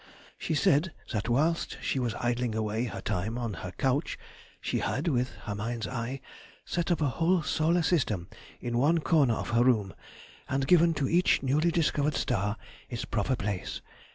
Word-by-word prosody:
She 160 Hz, -, -1 dB
said 150 Hz, +4 st, +3 dB, 0.2 s
that 110 Hz, 0 st, -2 dB
whilst 155 Hz, +7 st, +1 dB
she 135 Hz, -, -1 dB
was 120 Hz, -3 st, -1 dB
idling 120 Hz, -1 st, -1 dB
away 110 Hz, +2 st, -1 dB
her 100 Hz, -5 st, -5 dB
time 105 Hz, +4 st, -2 dB
on 120 Hz, -3 st, -2 dB
her 95 Hz, -, -5 dB
couch 135 Hz, +4 st, 0 dB, 0.4 s
she -, -, -1 dB
had—with 130 Hz, -4 st, 0 dB
her 105 Hz, -, -3 dB
mind's 110 Hz, +2 st, -3 dB
eye—set 130 Hz, -, -5 dB
up 175 Hz, -2 st, +1 dB
a -, -, +3 dB
whole 165 Hz, +6 st, +2 dB
solar 165 Hz, +3 st, +2 dB
system 110 Hz, -, +1 dB, 0.3 s
in 120 Hz, 0 st, -1 dB
one 160 Hz, +5 st, +3 dB
corner 145 Hz, -8 st, +3 dB
of -, -, -4 dB
her 115 Hz, +1 st, +4 dB
room, 110 Hz, -7 st, +2 dB, 0.6 s
and 135 Hz, 0 st, 0 dB
given 170 Hz, +1 st, +5 dB
to 140 Hz, -3 st, 0 dB
each 175 Hz, -2 st, +3 dB
newly 150 Hz, +5 st, +2 dB
discovered 150 Hz, -3 st, +1 dB
star 105 Hz, -3 st, 0 dB, 0.3 s
its 120 Hz, -2 st, -4 dB
proper 115 Hz, +4 st, 0 dB
place. 100 Hz, -4 st, -3 dB
125 Hz, 165 wpm, -29 LUFS, 115-155 Hz, 0.6 s, given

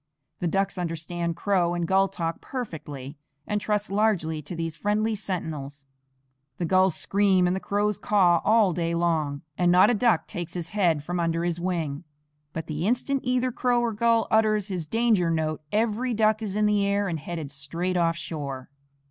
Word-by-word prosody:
The 175 Hz, -, -1 dB
ducks 195 Hz, +2 st, 0 dB
understand 170 Hz, 0 st, -3 dB
crow 175 Hz, -3 st, +1 dB
and 170 Hz, -1 st, -1 dB
gull 195 Hz, +1 st, +4 dB
talk 165 Hz, -3 st, -4 dB
perfectly, 150 Hz, -, -6 dB, 0.3 s
and 210 Hz, 0 st, -1 dB
trust 210 Hz, -1 st, -1 dB
largely 195 Hz, -7 st, +1 dB
to 150 Hz, +5 st, -7 dB
these 165 Hz, -1 st, -3 dB
friendly 210 Hz, +4 st, 0 dB
sentinels. 155 Hz, -8 st, -4 dB, 0.7 s
The 175 Hz, -, -1 dB
gulls 185 Hz, +1 st, +3 dB
scream 195 Hz, -2 st, +2 dB
and 180 Hz, +1 st, +1 dB
the -, -, -2 dB
crows 205 Hz, +1 st, -1 dB
caw 180 Hz, -5 st, +3 dB
all 215 Hz, -4 st, +4 dB
day 170 Hz, 0 st, -1 dB
long, 160 Hz, -4 st, 0 dB, 0.2 s
and 175 Hz, -1 st, +4 dB
not 185 Hz, +5 st, +6 dB
a -, -, +2 dB
duck 225 Hz, -5 st, +2 dB
takes 175 Hz, 0 st, -6 dB
his 170 Hz, -1 st, -4 dB
head 175 Hz, -8 st, +1 dB
from 175 Hz, +3 st, -3 dB
under 165 Hz, 0 st, 0 dB
his 175 Hz, -1 st, -1 dB
wing; 170 Hz, -5 st, -2 dB, 0.5 s
but 160 Hz, -, -5 dB
the 155 Hz, +4 st, -2 dB
instant 255 Hz, +3 st, 0 dB
either 255 Hz, 0 st, +1 dB
crow 245 Hz, 0 st, +1 dB
or 235 Hz, -1 st, 0 dB
gull 230 Hz, +1 st, +2 dB
utters 215 Hz, -2 st, +2 dB
his 175 Hz, -5 st, -3 dB
danger 225 Hz, -4 st, +2 dB
note 155 Hz, -1 st, -1 dB
every 230 Hz, +3 st, 0 dB
duck 215 Hz, 0 st, +2 dB
is 205 Hz, -3 st, -3 dB
in 210 Hz, 0 st, +2 dB
the 210 Hz, -1 st, +2 dB
air 200 Hz, 0 st, +1 dB
and 165 Hz, -3 st, -2 dB
headed 155 Hz, -2 st, -6 dB
straight 165 Hz, +7 st, -3 dB
off 165 Hz, -1 st, +2 dB
shore. 140 Hz, -5 st, -6 dB
180 Hz, 180 wpm, -26 LUFS, 165-210 Hz, 0.7 s, not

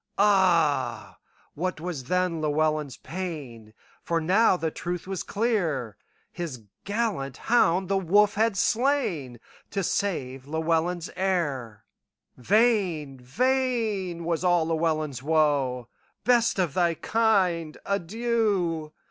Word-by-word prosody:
Ah, 165 Hz, -, +2 dB, 0.3 s
what 185 Hz, +2 st, -3 dB
was 160 Hz, -6 st, -5 dB
then 180 Hz, +1 st, 0 dB
Llewelyn's 155 Hz, -2 st, 0 dB
pain! 145 Hz, -10 st, -7 dB, 0.3 s
For 170 Hz, -1 st, 0 dB
now 185 Hz, +4 st, +3 dB
the 160 Hz, -2 st, -2 dB
truth 175 Hz, +1 st, -4 dB
was 190 Hz, -1 st, -4 dB
clear; 175 Hz, -, -1 dB, 0.4 s
His 155 Hz, -10 st, -6 dB, 0.2 s
gallant 200 Hz, -, -2 dB
hound 190 Hz, -6 st, +2 dB
the 195 Hz, +1 st, +1 dB
wolf 205 Hz, +3 st, +3 dB
had 220 Hz, +1 st, +2 dB
slainTo 195 Hz, -, 0 dB, 0.5 s
save 135 Hz, -11 st, -2 dB
Llewelyn's 165 Hz, +2 st, -1 dB
heir:Vain, 170 Hz, -, -1 dB
vain 215 Hz, -, -1 dB
was 170 Hz, 0 st, -1 dB
all 175 Hz, -2 st, +3 dB
Llewelyn's 155 Hz, -5 st, -1 dB
woe;"Best 155 Hz, -, 0 dB
of 175 Hz, -6 st, 0 dB
thy 170 Hz, -1 st, +2 dB
kind, 185 Hz, -8 st, +1 dB
adieu! 200 Hz, -5 st, -1 dB
170 Hz, 95 wpm, -26 LUFS, 150-200 Hz, 0.5 s, now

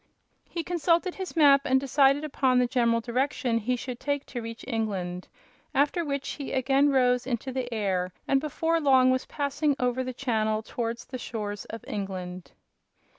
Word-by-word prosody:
He 335 Hz, -, -3 dB
consulted 345 Hz, +1 st, +1 dB
his 380 Hz, -2 st, -6 dB
map 285 Hz, -3 st, +6 dB
and 265 Hz, -1 st, +3 dB
decided 275 Hz, +1 st, +3 dB
upon 265 Hz, -4 st, +1 dB
the 250 Hz, -, +4 dB
general 235 Hz, -2 st, +2 dB
direction 250 Hz, 0 st, 0 dB
he 250 Hz, +3 st, 0 dB
should 245 Hz, 0 st, -6 dB
take 285 Hz, -1 st, -2 dB
to 245 Hz, -, -6 dB
reach 230 Hz, 0 st, -8 dB
England, 195 Hz, -7 st, -3 dB, 0.5 s
after 290 Hz, +5 st, +2 dB
which 280 Hz, -3 st, -3 dB
he 280 Hz, -, -5 dB
again 270 Hz, +2 st, +3 dB
rose 250 Hz, -2 st, +2 dB
into 260 Hz, +1 st, -2 dB
the 250 Hz, -1 st, -3 dB
air 190 Hz, -5 st, -1 dB, 0.2 s
and 275 Hz, -1 st, +3 dB
before 325 Hz, +2 st, 0 dB
long 260 Hz, -3 st, +5 dB
was 255 Hz, 0 st, -1 dB
passing 285 Hz, 0 st, 0 dB
over 250 Hz, +1 st, 0 dB
the 255 Hz, -, -4 dB
channel 220 Hz, -4 st, -1 dB
towards 235 Hz, +1 st, -4 dB
the 255 Hz, -, -7 dB
shores 205 Hz, -3 st, -5 dB
of 225 Hz, -1 st, -8 dB
England. 185 Hz, -3 st, -5 dB
255 Hz, 170 wpm, -27 LUFS, 230-280 Hz, 0.5 s, map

